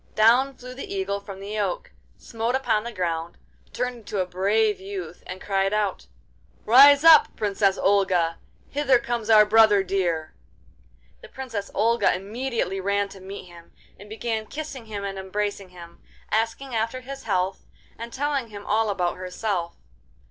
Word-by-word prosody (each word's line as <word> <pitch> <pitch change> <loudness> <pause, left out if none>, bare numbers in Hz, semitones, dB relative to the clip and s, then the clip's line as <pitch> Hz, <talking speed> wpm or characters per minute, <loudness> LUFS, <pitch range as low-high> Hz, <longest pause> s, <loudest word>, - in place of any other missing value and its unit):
Down 245 +5 +4
flew 250 0 -10
the 265 - -8
Eagle 200 +1 -2
from 200 -1 -10
the 205 +2 -5
oak, - - -2 0.3
smote 230 +2 -3
upon 240 -5 +1
the 235 - -6
ground, 170 -4 -3 0.3
turned 250 0 -3
into 210 -3 -5
a 185 - +1
brave 205 +4 +1
youth, 190 -3 -7
and 185 +1 -7
cried 195 0 0
aloud: 210 -3 -1 0.6
'Rise 280 +5 +8
up, 325 -2 +7
Princess 200 -2 +1
Olga! 185 -4 +2 0.3
Hither 275 -3 +3
comes 235 -2 -4
our 215 -1 +7
brother 210 -2 +5
dear!' 175 -4 -1 0.9
The - - -13
Princess 235 -7 -6
Olga 230 +1 +2
immediately 210 0 -3
ran 200 +1 0
to 195 - -12
meet 190 +1 -9
him, 170 -1 -16 0.3
and 205 +1 -13
began 220 0 -3
kissing 280 -5 -7
him 205 -2 -5
and 195 -1 -4
embracing 200 0 -3
him, 170 -1 -13 0.3
asking 230 +4 -1
after 230 +3 -2
his 270 +1 -9
health, 190 -2 -1 0.3
and 235 +1 -8
telling 275 -2 -1
him 205 -2 -10
all 220 +1 +1
about 180 -3 -1
herself. 185 -1 -3
210 Hz, 155 wpm, -24 LUFS, 190-235 Hz, 0.9 s, Rise